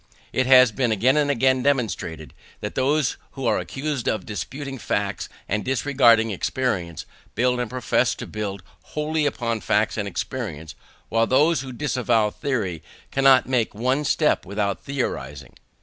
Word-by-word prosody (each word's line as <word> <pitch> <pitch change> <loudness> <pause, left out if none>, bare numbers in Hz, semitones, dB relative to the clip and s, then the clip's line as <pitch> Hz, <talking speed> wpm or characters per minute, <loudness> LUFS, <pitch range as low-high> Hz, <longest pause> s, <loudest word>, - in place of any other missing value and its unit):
It 130 -1 +1
has 130 -3 +7
been 125 -1 0
again 120 +6 +3
and 150 -1 +2
again 130 -1 +2
demonstrated, 105 - -1 0.3
that - - -5
those 140 +1 +1 0.2
who 135 -2 -5
are 115 - +2
accused 140 -2 -4
of 110 - -2
despising 135 +5 -5
facts 100 -2 -2 0.2
and 105 +2 -1
disregarding 120 -4 +3
experience 95 - -2 0.3
build 125 +1 +2
and 120 -2 -2
profess 125 -1 +1
to - - -7
build 100 -3 -5 0.3
wholly 150 0 +1
upon 115 -5 -2
facts - - +1
and - - -2
experience; 80 0 -5 0.4
while 115 0 +2
those 150 +3 +3
who 130 -1 -7
disavow 120 -5 +1
theory 105 - -2 0.3
cannot 135 -1 +5
make 125 -5 0
one 130 +6 0
step 150 +1 +2
without 100 +1 -2
theorizing. 75 - -4
125 Hz, 150 wpm, -23 LUFS, 105-135 Hz, 0.4 s, has